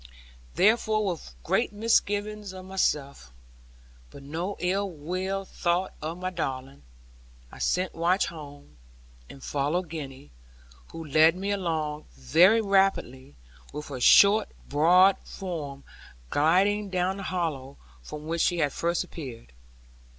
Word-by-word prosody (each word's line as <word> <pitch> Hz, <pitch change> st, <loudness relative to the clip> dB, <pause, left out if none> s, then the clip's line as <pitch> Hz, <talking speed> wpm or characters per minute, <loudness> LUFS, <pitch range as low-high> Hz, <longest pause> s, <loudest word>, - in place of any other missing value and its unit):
Therefore, 215 Hz, 0 st, +3 dB
with 165 Hz, -, -5 dB
great -, -, +1 dB
misgiving 210 Hz, -1 st, 0 dB
of 185 Hz, 0 st, -9 dB
myself, 145 Hz, -, -2 dB, 0.8 s
but 140 Hz, -, -13 dB
no 170 Hz, +8 st, -4 dB
ill 185 Hz, +1 st, -2 dB
thought 180 Hz, 0 st, -1 dB
of 160 Hz, +3 st, -4 dB
my 185 Hz, 0 st, -4 dB
darling, 135 Hz, -5 st, -5 dB, 0.7 s
I -, -, -12 dB
sent 180 Hz, 0 st, 0 dB
Watch 175 Hz, +4 st, +1 dB
home, 145 Hz, -, -11 dB, 0.5 s
and 135 Hz, -, -12 dB
followed 155 Hz, +5 st, -1 dB
Gwenny; 135 Hz, -, -8 dB, 0.6 s
who 165 Hz, -, -9 dB
led 155 Hz, +3 st, +5 dB
me 195 Hz, +2 st, -3 dB
along 160 Hz, -6 st, -2 dB
very 175 Hz, -, +4 dB
rapidly, 195 Hz, -, 0 dB, 0.4 s
with 150 Hz, 0 st, -7 dB
her 130 Hz, -3 st, -6 dB
short 205 Hz, -, +6 dB, 0.2 s
broad 180 Hz, +7 st, +5 dB
form 150 Hz, -8 st, -7 dB, 0.5 s
gliding 195 Hz, +7 st, +2 dB
down 185 Hz, +1 st, -1 dB
the 195 Hz, -, -6 dB
hollow, 150 Hz, -7 st, -3 dB, 0.2 s
from 150 Hz, -, -9 dB
which 165 Hz, +1 st, -1 dB
she 175 Hz, -, +2 dB
had 145 Hz, -4 st, 0 dB
first 170 Hz, +1 st, -1 dB
appeared. 130 Hz, -, -10 dB
170 Hz, 120 wpm, -27 LUFS, 145-190 Hz, 0.8 s, short